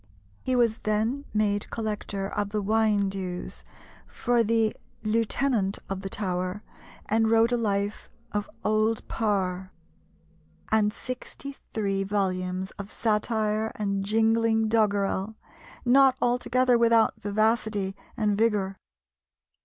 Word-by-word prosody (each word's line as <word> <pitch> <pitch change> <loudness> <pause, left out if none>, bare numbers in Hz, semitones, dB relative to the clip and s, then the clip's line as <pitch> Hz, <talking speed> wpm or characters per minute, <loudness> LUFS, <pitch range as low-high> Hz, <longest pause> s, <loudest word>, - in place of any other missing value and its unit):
He 255 - 0
was 235 -2 +2
then 220 +7 -1
made 205 -1 0
collector 210 -3 -3
of 205 0 -2
the 210 0 -1
wine 215 -1 +2
dues 185 -2 -5 0.4
for 240 -1 +1
the 225 0 +2 0.3
lieutenant 225 -1 +1
of 195 -1 -3
the 195 - -4
Tower, 185 0 -2 0.4
and 220 +1 +2
wrote 225 +1 +4
a - - +3
life 205 -2 -1 0.2
of 205 0 -2 0.2
Old 215 +1 +1
Parr, 190 -4 -1 1.0
and 215 -1 +3
sixty 255 +4 -7 0.2
three 200 -3 -1
volumes 190 -2 -1
of 200 +1 -6
satire 215 0 0
and 200 -2 -1
jingling 225 +1 +2
doggerel, 205 -1 +1 0.5
not 260 +1 +5
altogether 245 0 +2
without 230 -1 +4
vivacity 210 -1 0 0.2
and 210 -3 +1
vigour. 205 -3 +1
215 Hz, 115 wpm, -27 LUFS, 200-225 Hz, 1.0 s, not